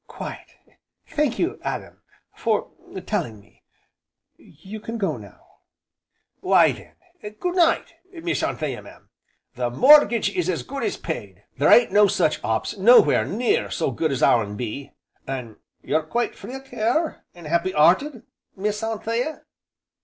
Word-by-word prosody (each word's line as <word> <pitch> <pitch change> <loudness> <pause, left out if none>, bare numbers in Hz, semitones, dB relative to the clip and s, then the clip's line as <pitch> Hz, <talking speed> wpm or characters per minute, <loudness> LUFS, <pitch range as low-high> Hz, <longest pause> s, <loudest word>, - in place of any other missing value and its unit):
"Quite! - - -9 0.5
Thank 295 -5 -1
you, 345 +3 -1
Adam - - -6 0.3
for 220 -3 -1 0.3
telling 155 - -3
me. 100 - -25 0.7
You 215 +3 -12
can 225 +2 -6
go 200 -3 -1
now." - - -14 0.9
"Why - - +4 0.5
then 210 0 -9
Good 355 +11 -3
night! 340 -3 +2 0.2
Miss 340 -1 -3
Anthea, - - -3
mam, - - -17 0.4
the 125 -2 -2
mortgage 240 - +5
is 180 0 0
as 175 - -1
good 275 +1 -6
as 410 - -2
paid, - - -6 0.2
there - - +4
ain't 240 -4 +6
no 205 +1 +6
such 155 - 0
'ops 110 0 -1
nowhere 235 +6 +6
near 230 +4 0
so 160 - -1
good 155 +5 -1
as 135 - -1
our'n 105 -3 +2
be. 125 +4 -5 0.4
An' 125 -5 -6 0.3
you're 160 - +1
quite 235 +10 -2
free 255 - -9
o' 270 - -7
care, 270 +5 -1
an' 175 -2 -13
'appy 170 +4 0
'earted, 190 - +3 0.3
Miss 210 +2 -2
Anthea?" 230 +6 -3
210 Hz, 145 wpm, -23 LUFS, 155-245 Hz, 0.9 s, ain't